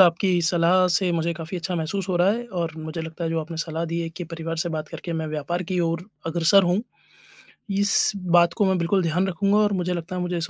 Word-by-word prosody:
आपकी 180 0 +4
सलाह 175 +2 +3
से 180 +2 +2
मुझे 170 0 0
काफ़ी 170 +2 -6
अच्छा 175 +1 -3
महसूस 175 +4 -2
हो 185 - +1
रहा 180 +3 +4
है 235 +3 -2
और 165 -2 -1
मुझे 160 +1 -5
लगता 160 +1 -6
है 165 - -1
जो 165 0 0
आपने 165 +1 -7
सलाह 165 0 -3
दी 165 +1 -3
है 165 - -3
कि 175 +2 -7
परिवार 165 0 -5
से 170 +2 -1
बात 155 -2 -4
करके 170 - -6
मैं 160 -1 -2
व्यापार 155 +4 -3
की 185 - 0
ओर 165 0 -1 0.2
अग्रसर 170 +4 +4
होऊँ, 180 +3 +2 0.9
इस 200 +1 +3
बात 175 -3 +3
को 210 - +1
मैं 190 -1 +2
बिल्कुल 180 +2 +1
ध्यान 175 +3 +1
रखूँगा 195 +3 +1
और 210 -1 +3
मुझे 180 -1 -1
लगता 175 +2 -5
है 180 - -2
मुझे 180 0 -2
इस 165 - -2
170 Hz, 245 wpm, -24 LUFS, 165-185 Hz, 0.9 s, आपकी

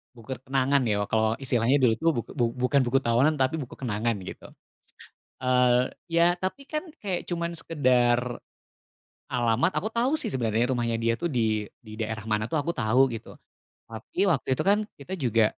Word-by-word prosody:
buku 115 +2 -11 0.2
kenangan, 135 +1 +2
ya, 105 -1 +1
kalau 110 0 +1
istilahnya 125 0 +2
dulu, 120 -4 +4
tuh, 165 +8 +1 0.3
bu 120 - +2
bukan 125 +2 +2
buku 130 +2 +2
tahunan, 125 +7 +3
tapi 130 +4 +2
buku 125 - -8
kenangan, 115 -2 -1
gitu. - - -9 0.9
Eee, 125 0 +3 0.2
ya, 170 +1 +3
tapi, 190 +10 -4
kan, 305 +1 -3 0.2
kayak 190 -4 -3
cuman 170 0 -2
sekedar 125 -5 +2 0.9
alamat 120 +6 +1
aku 215 - -3
tau, 240 +4 +1
sih, 300 - -2
sebenarnya 120 -1 0
rumahnya 120 -2 0
dia, 115 0 +2
tuh, 170 - 0
di 110 -5 0 0.2
di 110 -1 -10
daerah 110 -1 -3
mana, 105 0 +1
tuh, 160 - 0
aku 170 - -2
tau, 125 +3 +3
gitu, 115 -1 -8 0.6
tapi 110 +9 -10
waktu 150 -8 0
itu, - - -2
kan, 200 +2 +4 0.2
kita 145 +7 -10
juga, 115 -5 +2
125 Hz, 170 wpm, -26 LUFS, 115-145 Hz, 0.9 s, dulu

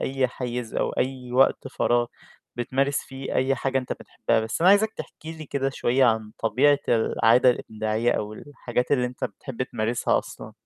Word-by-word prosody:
أي 130 -1 0
حيّز 125 -2 -5
أو - - 0
أي 130 -1 -3
وقت 135 +1 +3
فراغ 120 -2 +1 0.5
بتمارس 135 +3 0
فيه 135 0 -7
أي 135 +1 +2
حاجة 135 0 -1
أنت 125 - -3
بتحبّها. - - -1
بس 110 +6 -3
أنا 180 +3 +6
عايزك 215 +2 +4
تحكي 160 +1 -8
لي 160 -1 -9
كده 135 -1 -1
شوية 130 0 +2
عن 110 -3 +1
طبيعة 135 +6 +3
العادة 115 +2 +4
الإبداعية 110 0 -1
أو 105 0 -3
الحاجات 125 -1 -4
اللي 125 -3 +3
أنت 125 +1 -5
بتحب 120 +3 -5
تمارسها 115 -1 0
أصلًا. - - -8
125 Hz, 170 wpm, -25 LUFS, 120-135 Hz, 0.5 s, أنا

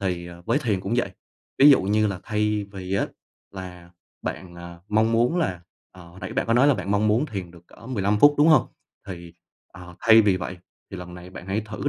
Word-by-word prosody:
thì, 90 -3 -2
ờ, 85 0 -12
với 145 - +2
thiền 105 -9 -1
cũng 100 +5 -3
vậy. - - 0 0.5
Ví 145 +2 +8
dụ 135 - +5
như 105 +2 +2
là 95 -3 -4
thay 105 -1 -1
vì 95 0 -5
á 100 - +1 0.4
là 90 -2 -10 0.3
bạn, 90 -2 -6
à, 85 0 -10
mong 110 +2 +2
muốn 120 +9 +2
là, 95 - -1 0.3
ờ 90 -2 -14
hồi 90 +3 -15
nãy - - -6
bạn - - -1
có 115 - +1
nói 130 +4 +5
là 145 - +4
bạn 100 - -5
mong 105 +1 +2
muốn 115 +8 +2
thiền 95 - -6
được 85 0 -18
cỡ 115 - -16
15 105 -4 0
phút, 145 +3 +6
đúng 150 +2 +5
hông? 155 - +5 0.4
Thì, 85 -3 -9 0.4
ờ, 90 0 -12
thay 115 0 +7
vì 100 -3 +2
vậy 90 0 -6 0.3
thì - - -7
lần 90 -1 -9
này 90 +1 -11
bạn 95 - -10
hãy 100 +3 -1
thử 110 +6 -4
100 Hz, 235 wpm, -24 LUFS, 90-110 Hz, 0.5 s, Ví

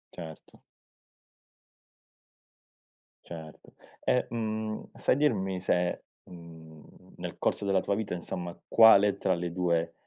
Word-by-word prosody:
Certo. 80 -2 -11 2.6
Certo, 80 -2 -11 0.3
e, 125 - +2
mhmm, 110 -1 -3
sai - - +2
dirmi 100 -10 +1
se, 90 -1 0 0.2
mhmm, 80 -3 -14
nel - - -7
corso - - 0
della 95 -1 +2
tua 100 - -1
vita 110 -2 -3
insomma, 90 0 -5
quale 105 -3 +7
tra 95 - +1
le 85 -1 -3
due, 85 -2 0
90 Hz, 105 wpm, -29 LUFS, 85-110 Hz, 2.6 s, quale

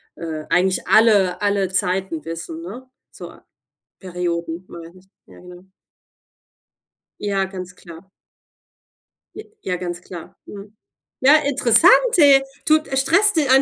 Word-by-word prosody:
äh, 155 -2 -7
eigentlich 185 +1 0
alle 205 -5 +3
alle 200 -2 -1
Zeiten 185 -4 -2
wissen, 165 0 -8
ne? 245 +9 -10 0.2
So, - - -12 0.6
Perioden, 175 -1 -5
meine 170 +1 -12
ich. 190 - -27 0.2
Ja, - - -17
genau. 180 0 -15 1.6
Ja, 200 -2 -2
ganz 185 -1 -9
klar. 170 +2 -15 1.5
Ja, 180 - -3
ganz 175 -1 -6
klar. 175 -2 -12
Mhm. 205 +1 -12 0.5
Ja, 275 +3 +6
interessant, 275 - +4 0.3
hey, 280 -4 +5 0.2
tut 310 0 +2
stresst 370 +10 +2
di 305 -4 +1
190 Hz, 115 wpm, -19 LUFS, 175-230 Hz, 1.6 s, Ja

